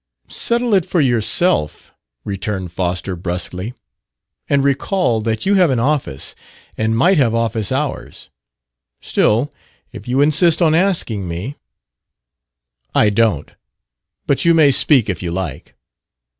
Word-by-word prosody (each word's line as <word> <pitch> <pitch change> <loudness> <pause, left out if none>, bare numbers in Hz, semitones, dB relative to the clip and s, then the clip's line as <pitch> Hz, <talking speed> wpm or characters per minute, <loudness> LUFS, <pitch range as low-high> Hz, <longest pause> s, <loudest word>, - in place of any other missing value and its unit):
"Settle 235 -1 0
it 190 -3 +4
for 175 - -1
yourself," 120 - 0 0.3
returned 95 -2 -4
Foster 90 +1 -3
brusquely. 90 +4 -4 0.8
"And 140 -1 +2
recall 140 - 0
that 110 0 -2
you 200 - +2
have 185 -4 +4
an 130 -3 0
office 130 - -2 0.4
and 110 +1 0
might 175 +7 +3
have 115 -4 +2
office 115 -1 -1
hours. 140 +2 -4 0.7
Still, 120 +7 +1 0.4
if 100 - -11
you 125 +2 0
insist 155 +3 +4
on 165 -3 +3
asking 160 - +1
me 90 +12 -5 0.7
" - - -37
"I 105 - +3
don't. 100 -9 0 0.7
But 140 - +1
you 170 0 +4
may 150 -3 +5
speak, 130 -3 +3
if 90 -5 -3
you 90 - -3
like." 85 -5 -6
115 Hz, 130 wpm, -18 LUFS, 95-150 Hz, 0.8 s, may